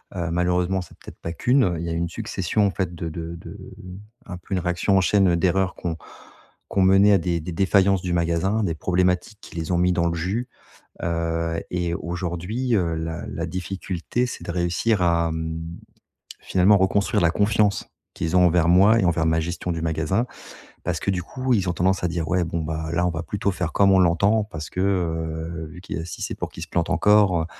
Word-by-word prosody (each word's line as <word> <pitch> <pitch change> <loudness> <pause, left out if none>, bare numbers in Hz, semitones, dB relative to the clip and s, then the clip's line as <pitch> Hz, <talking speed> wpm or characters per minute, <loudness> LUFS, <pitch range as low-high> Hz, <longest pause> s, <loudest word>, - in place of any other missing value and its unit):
heu, 85 -2 -2
malheureusement 90 +2 +1
c'est 85 - -13
peut-être - - -12
pas 85 - -4
qu'une, 120 -5 +2
il 85 - -4
y - - -3
a 80 - -2
une 85 +1 -1
succession 105 +4 -1
en - - 0
fait 95 -3 -3
de 85 0 -4
de 85 +1 -6
de 85 - -10 0.7
un 90 - -7
peu 90 - -8
une 95 - +1
réaction 90 +2 +1
en - - +4
chaîne 95 -1 +3
d'erreurs 95 +2 +1
qui 90 - -6
ont 80 - -1
qui 95 - -10
ont - - +5
mené 95 +2 +6
à - - +6
des 85 -1 -1
des 90 +2 -6
défaillances 95 +1 +3
du 90 - -2
magasin, 85 +5 +1
des 85 -5 -1
problématiques 90 +4 0
qui - - -13
les 80 0 -3
ont 85 - +2
mis 90 +1 +3
dans 85 -1 +1
le 85 - 0
jus. 100 +9 -2 0.6
Heu 85 0 -1
et 90 -1 -1
aujourd'hui, 90 +8 -2
heu, 85 -4 0
la 80 +1 -4
la - - -4
difficulté, 95 +5 -3
c'est - - -7
de - - -3
réussir 90 +4 0
à, 85 -1 +2
hem, 80 0 -4 0.8
finalement, 95 +3 +4
reconstruire 100 +1 +1
la 85 - +4
confiance 105 +1 +1 0.3
qu'ils 80 +2 -1
ont 90 - +6
envers 85 0 +3
moi 100 +6 +6
et - - 0
envers 85 -1 +1
ma 80 0 +2
gestion 90 +2 -3
du 80 - -4
magasin. 80 +8 0 0.6
Parce 85 -2 -2
que - - 0
du 90 -2 -1
coup, 130 +7 -2
ils 95 -4 0
ont - - +1
tendance 90 +1 +1
à - - +2
dire: 80 -1 -3
«Ouais, 90 0 +1
bon, 85 0 -3
bah, 80 0 -4
là, 85 +1 +1
on - - +1
va 80 0 -4
plutôt 100 +1 -1
faire 90 -2 -3
comme 100 -1 +4
on 95 - +5
l'entend 100 +5 +3
parce 80 -7 -8
que, 90 - -4
heu, 80 -3 -2
vu 90 - -11
qu'il 95 - -5
a - - -5
si 85 - -7
c'est - - -3
pour - - -4
qu'il - - -10
se - - -6
plante - - -1
encore, 105 -5 +4
heu» - - -4
90 Hz, 225 wpm, -23 LUFS, 85-95 Hz, 0.8 s, mené